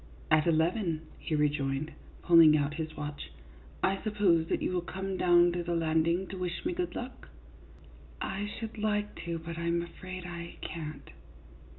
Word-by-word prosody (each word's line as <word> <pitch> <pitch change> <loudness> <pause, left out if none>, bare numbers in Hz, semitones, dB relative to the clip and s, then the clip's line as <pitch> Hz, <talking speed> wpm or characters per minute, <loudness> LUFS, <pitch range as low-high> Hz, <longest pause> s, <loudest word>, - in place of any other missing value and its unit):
" - - -22
At 155 +1 +5
eleven," 165 +1 +2 0.2
he 155 - -2
rejoined, 145 0 0 0.3
pulling 165 -3 +8
out 145 0 0
his 155 0 -5
watch. 145 0 -5 0.3
" - - -22
I 195 0 +2
suppose 195 -7 +2
that - - 0
you - - -1
will 180 -1 0
come 190 +2 -4
down 175 -1 +5
to 175 0 -2
the 170 0 -1
landing 165 +2 +2
to 190 - -6
wish 180 - -3
me 350 - +1
good 355 0 -3
luck? 250 +2 -7 0.3
" - - -21
" - - -22
I 200 +2 -2
should 220 +1 -6
like 210 -1 0
to, 170 -1 -2
but 165 0 -6
I 170 - -2
'm 170 0 +1
afraid 185 +1 -8
I 170 -1 -7
can't." 155 -2 -6
170 Hz, 190 wpm, -30 LUFS, 160-190 Hz, 0.3 s, pulling